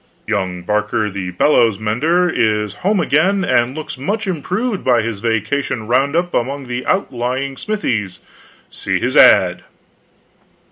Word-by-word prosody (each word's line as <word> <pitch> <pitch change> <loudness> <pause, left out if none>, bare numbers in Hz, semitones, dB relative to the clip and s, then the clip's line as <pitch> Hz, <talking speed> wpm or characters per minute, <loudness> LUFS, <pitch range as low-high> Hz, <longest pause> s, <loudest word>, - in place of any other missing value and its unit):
Young 95 -4 -2
Barker 105 +2 -1
the 95 -1 -5
bellows 110 +2 +2
mender 145 - +1
is 105 - 0
hoMe 195 - +1
again, 190 +7 +2
and 125 -5 +1
looks 155 -4 -7
much 210 +11 -2
improved 190 - -2
by 120 -3 +3
his 110 -3 -4
vacation 115 +2 -2
round 135 +6 +1
up 175 +1 0
among 135 +3 -2
the 125 0 -4
out 190 -6 0
lying 130 +3 -3
smithies. 115 - -3 0.5
See - - -2
his - - -2
ad. - - +6
125 Hz, 140 wpm, -17 LUFS, 105-165 Hz, 0.5 s, ad